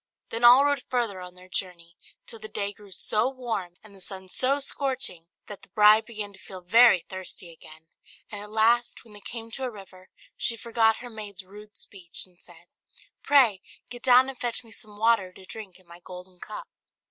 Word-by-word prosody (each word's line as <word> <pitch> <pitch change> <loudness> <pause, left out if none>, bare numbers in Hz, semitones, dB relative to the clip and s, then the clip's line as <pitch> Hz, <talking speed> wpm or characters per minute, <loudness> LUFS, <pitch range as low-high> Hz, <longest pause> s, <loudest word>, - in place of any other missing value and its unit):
Then 230 +1 -4
all 250 +4 +9
rode 285 -1 +1
further 230 -7 -1
on 180 0 -10
their 180 0 -15
journey, 175 -2 -6 0.3
till 225 - -9
the 215 - -8
day 200 -1 -3
grew 205 0 -16
so 215 +6 0
warm, 225 -9 -4
and 215 -2 -14
the 195 - -13
sun 190 0 -7
so 265 +7 +3
scorching, 265 - 0 0.2
that 205 - -9
the - - -15
bride 215 +2 +6
began 210 -3 -6
to 190 - -12
feel 185 -1 -10
very 210 +1 +6
thirsty 185 -2 -6
again; 160 -1 -15 0.5
and 205 -1 -5
at 210 - -8
last, 225 +3 +2
when 220 - -14
they 205 - -13
came 230 +2 -7
to 265 - -5
a 255 - -1
river, 190 -4 -13 0.3
she 230 - 0
forgot 225 -1 +2
her - - -7
maid's 205 -4 -8
rude 210 +2 -14
speech, 180 -4 -4
and 180 -2 -17
said, - - -14 0.6
"Pray 245 -9 +4 0.3
get 245 -1 -7
down 255 0 +6
and 270 -2 -7
fetch 240 0 0
me 225 - -17
some 215 -3 -9
water 220 -4 +3
to 190 - -14
drink 195 -3 -9
in 185 - -22
my 170 0 -14
golden 180 0 -12
cup." 215 - -8
210 Hz, 205 wpm, -27 LUFS, 185-235 Hz, 0.6 s, all